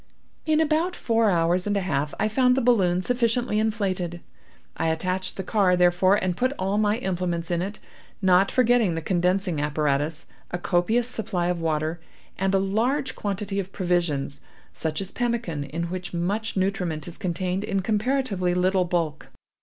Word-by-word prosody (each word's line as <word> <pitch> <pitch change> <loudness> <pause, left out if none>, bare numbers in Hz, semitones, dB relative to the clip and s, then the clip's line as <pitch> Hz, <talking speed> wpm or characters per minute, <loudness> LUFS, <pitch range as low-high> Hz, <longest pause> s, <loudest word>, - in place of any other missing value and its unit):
"In 310 0 +3
about 320 +3 +1
four 225 -2 +2
hours 175 +1 +2
and 205 0 +1
a - - +1
half 150 -5 -1
I 215 - +2
found 250 +3 +3
the - - +3
balloon 185 -7 +3
sufficiently 240 -2 +1
inflated. 190 -6 -1 0.6
I 165 - -1
attached 185 +4 -1
the 190 - -3
car, 185 -2 +2
therefore, 180 +2 +4
and 185 -3 0
put 255 +7 0
all 195 +2 0
my 210 0 +2
implements 180 -5 -2
in 170 0 +1
it—not 190 -1 0
forgetting 240 -7 +3
the 165 - -4
condensing 180 -2 +1
apparatus, 150 +1 0 0.2
a 175 - -2
copious 195 +7 +1
supply 190 -8 -2
of 175 -1 -1
water, 160 +1 -1 0.4
and 195 +1 +1
a - - +5
large 235 +9 0
quantity 200 -1 -3
of 195 0 -4
provisions, 170 -7 -1 0.3
such 155 +1 -3
as 195 0 -5
pemmican, 230 -12 -2
in 160 +5 -4
which 180 -1 -5
much 200 +6 -1
nutriment 180 -5 -1
is 175 - -9
contained 185 0 -2
in 195 -2 -1
comparatively 210 -3 0
little 185 0 +2
bulk. 165 -4 -2
185 Hz, 160 wpm, -25 LUFS, 175-215 Hz, 0.6 s, a